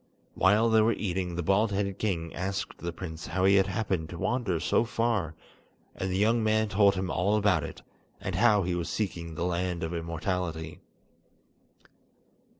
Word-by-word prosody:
While 105 Hz, +4 st, +3 dB
they 110 Hz, -1 st, +5 dB
were 115 Hz, +2 st, +3 dB
eating, 90 Hz, -4 st, -2 dB
the 85 Hz, -, -2 dB
bald 100 Hz, +5 st, +2 dB
headed 100 Hz, -1 st, -2 dB
king 85 Hz, -6 st, -2 dB
asked 95 Hz, +4 st, -4 dB
the 85 Hz, -, -4 dB
prince 85 Hz, -2 st, -7 dB
how 95 Hz, 0 st, 0 dB
he 100 Hz, -, +5 dB
had 95 Hz, 0 st, +3 dB
happened 95 Hz, -5 st, -2 dB
to 85 Hz, -, -7 dB
wander 105 Hz, -4 st, -1 dB
so 85 Hz, +6 st, +2 dB
far, 115 Hz, -8 st, -1 dB, 0.6 s
and 95 Hz, -, -3 dB
the 90 Hz, -, 0 dB
young 110 Hz, +3 st, +3 dB
man 110 Hz, 0 st, +2 dB
told 100 Hz, 0 st, +4 dB
him 95 Hz, -1 st, -2 dB
all 100 Hz, +5 st, +1 dB
about 105 Hz, -2 st, +2 dB
it, -, -, -8 dB, 0.4 s
and -, -, -4 dB
how 105 Hz, -4 st, +4 dB
he 90 Hz, 0 st, -1 dB
was 85 Hz, -1 st, -2 dB
seeking 85 Hz, -6 st, -3 dB
the 85 Hz, -, -2 dB
Land 90 Hz, -1 st, -1 dB
of 80 Hz, +1 st, -3 dB
Immortality. 85 Hz, -1 st, -3 dB
95 Hz, 175 wpm, -28 LUFS, 85-105 Hz, 0.6 s, they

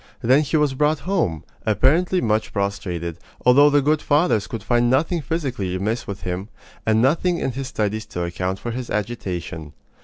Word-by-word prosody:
Then 130 Hz, +5 st, +5 dB
he 155 Hz, +1 st, 0 dB
was 150 Hz, -3 st, +2 dB
brought 150 Hz, +2 st, +1 dB
home, 160 Hz, -, -1 dB, 0.2 s
apparently 160 Hz, -, +2 dB
much 110 Hz, -1 st, 0 dB
prostrated, 90 Hz, -5 st, -3 dB, 0.3 s
although 140 Hz, +4 st, +7 dB
the 145 Hz, -1 st, +3 dB
good 150 Hz, +2 st, +2 dB
fathers 145 Hz, -, +2 dB
could 115 Hz, -4 st, -6 dB
find 120 Hz, +1 st, +2 dB
nothing 160 Hz, +6 st, +1 dB
physically 130 Hz, -, -2 dB
amiss 110 Hz, +5 st, -2 dB
with 100 Hz, -1 st, -6 dB
him, 90 Hz, +3 st, -4 dB, 0.4 s
and 110 Hz, +1 st, +3 dB
nothing 170 Hz, +6 st, +2 dB
in 130 Hz, -, -1 dB
his 135 Hz, +1 st, -5 dB
studies 110 Hz, -2 st, -2 dB
to 90 Hz, -, -4 dB
account 90 Hz, +2 st, -2 dB
for 120 Hz, -, -5 dB
his 125 Hz, +1 st, -5 dB
agitation. 90 Hz, -8 st, -4 dB
120 Hz, 175 wpm, -22 LUFS, 100-145 Hz, 0.4 s, although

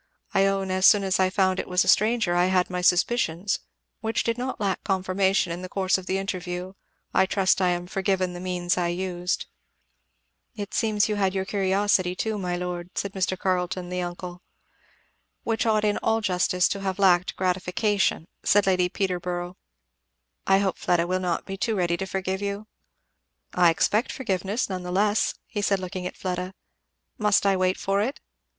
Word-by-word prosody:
I 195 Hz, 0 st, +4 dB
own 195 Hz, -1 st, -1 dB
as 185 Hz, 0 st, +4 dB
soon 205 Hz, -2 st, +6 dB
as 190 Hz, -1 st, +1 dB
I 185 Hz, 0 st, +3 dB
found 185 Hz, -1 st, +1 dB
it -, -, -3 dB
was 180 Hz, 0 st, +2 dB
a -, -, -6 dB
stranger 215 Hz, -4 st, +3 dB
I 175 Hz, +1 st, +3 dB
had 185 Hz, -1 st, +1 dB
my 180 Hz, 0 st, -2 dB
suspicions 180 Hz, 0 st, +1 dB, 0.4 s
which 225 Hz, 0 st, -1 dB
did 230 Hz, -, 0 dB
not 255 Hz, +2 st, -4 dB
lack 200 Hz, -2 st, -1 dB
confirmation 190 Hz, -1 st, +1 dB
in 170 Hz, +1 st, -4 dB
the 185 Hz, -, -7 dB
course 190 Hz, -1 st, +1 dB
of 190 Hz, -1 st, -3 dB
the 190 Hz, -, 0 dB
interview 185 Hz, -1 st, -4 dB, 0.4 s
I 190 Hz, -, +4 dB
trust 190 Hz, -1 st, +2 dB
I 180 Hz, -, +3 dB
am 175 Hz, 0 st, -1 dB
forgiven 190 Hz, 0 st, -1 dB
the 175 Hz, -, -7 dB
means 180 Hz, -1 st, -1 dB
I 175 Hz, -, +1 dB
used." 180 Hz, 0 st, -2 dB, 1.1 s
"It 205 Hz, -2 st, -6 dB
seems 215 Hz, -3 st, +2 dB
you 210 Hz, -1 st, -1 dB
had 195 Hz, -1 st, +1 dB
your 190 Hz, 0 st, -1 dB
curiosity 195 Hz, -1 st, +1 dB
too, 215 Hz, +2 st, -2 dB
my 180 Hz, -2 st, -2 dB
lord," 175 Hz, 0 st, -4 dB
said 200 Hz, -1 st, -2 dB
Mr. 185 Hz, -1 st, -1 dB
Carleton 180 Hz, -1 st, -1 dB
the 180 Hz, 0 st, -2 dB
uncle. 175 Hz, 0 st, -6 dB, 1.0 s
"Which 225 Hz, +1 st, 0 dB
ought 215 Hz, -1 st, +2 dB
in 210 Hz, 0 st, +1 dB
all 225 Hz, 0 st, +1 dB
justice 180 Hz, -3 st, +1 dB
to 200 Hz, -, -2 dB
have 190 Hz, -1 st, -2 dB
lacked 185 Hz, -2 st, +3 dB
gratification," 185 Hz, 0 st, 0 dB, 0.2 s
said 205 Hz, 0 st, +4 dB
Lady 185 Hz, -2 st, +2 dB
Peterborough. 180 Hz, -1 st, -3 dB, 0.9 s
"I 195 Hz, -, +5 dB
hope 195 Hz, -1 st, -1 dB
Fleda 170 Hz, -1 st, +2 dB
will 185 Hz, +1 st, 0 dB
not 180 Hz, -2 st, -2 dB
be 195 Hz, 0 st, -6 dB
too 220 Hz, +2 st, 0 dB
ready 175 Hz, -3 st, +1 dB
to 190 Hz, -, -4 dB
forgive 190 Hz, 0 st, -3 dB
you." 200 Hz, +1 st, -3 dB, 0.9 s
"I 175 Hz, -1 st, +5 dB
expect 210 Hz, +8 st, +1 dB
forgiveness 200 Hz, -2 st, -2 dB
nevertheless," 190 Hz, +3 st, 0 dB, 0.3 s
said 200 Hz, -1 st, +2 dB
he -, -, -9 dB
looking 180 Hz, 0 st, -4 dB
at -, -, -9 dB
Fleda. 185 Hz, 0 st, -4 dB, 0.6 s
"Must 210 Hz, -1 st, +3 dB
I 195 Hz, -1 st, +4 dB
wait 185 Hz, 0 st, +1 dB
for 195 Hz, +1 st, 0 dB
it?" 260 Hz, +7 st, -2 dB
190 Hz, 180 wpm, -25 LUFS, 180-200 Hz, 1.1 s, soon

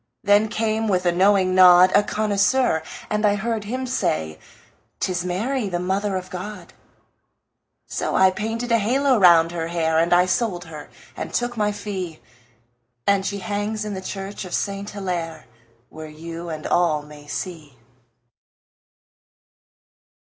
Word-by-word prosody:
Then 205 Hz, +2 st, +4 dB
came, 220 Hz, 0 st, -1 dB
with 185 Hz, -3 st, 0 dB
a 175 Hz, -, +4 dB
knowing 185 Hz, +1 st, +3 dB
nod, 185 Hz, 0 st, +7 dB
A 205 Hz, -, +6 dB
connoisseur, 210 Hz, -1 st, +1 dB, 0.3 s
and 210 Hz, 0 st, -1 dB
I 205 Hz, -1 st, +4 dB
heard 220 Hz, +1 st, -2 dB
him 255 Hz, +5 st, -3 dB
say; 80 Hz, -, -2 dB, 0.6 s
"'Tis 180 Hz, -2 st, -1 dB
Mary, 210 Hz, +6 st, -2 dB
the 175 Hz, -, -2 dB
Mother 190 Hz, +3 st, -1 dB
of 185 Hz, 0 st, -5 dB
God." 185 Hz, 0 st, -7 dB, 1.1 s
So -, -, -3 dB
I 190 Hz, 0 st, +5 dB
painted 225 Hz, +5 st, -3 dB
a 230 Hz, -, +4 dB
halo 255 Hz, +4 st, +2 dB
round 170 Hz, -3 st, +6 dB
her 165 Hz, -1 st, -3 dB
hair, 160 Hz, -1 st, +1 dB
And 170 Hz, +1 st, +1 dB
I 175 Hz, +1 st, +5 dB
sold 180 Hz, -1 st, -1 dB
her 155 Hz, -2 st, -10 dB, 0.3 s
and -, -, -5 dB
took 240 Hz, 0 st, -1 dB
my 210 Hz, -2 st, +1 dB
fee, 190 Hz, -6 st, -5 dB, 0.9 s
And 200 Hz, -1 st, +3 dB
she 200 Hz, -, -3 dB
hangs 210 Hz, +2 st, -2 dB
in 210 Hz, -, -4 dB
the 190 Hz, -, -5 dB
church 195 Hz, +1 st, -6 dB
of 185 Hz, -, -4 dB
Saint 200 Hz, 0 st, -3 dB
Hillaire, 175 Hz, -5 st, -4 dB, 0.4 s
Where 155 Hz, 0 st, -9 dB
you 165 Hz, +2 st, -8 dB
and 155 Hz, -1 st, -6 dB
all 160 Hz, -4 st, +1 dB
may 150 Hz, 0 st, -14 dB
see. 150 Hz, -4 st, -6 dB
190 Hz, 150 wpm, -22 LUFS, 170-210 Hz, 1.1 s, nod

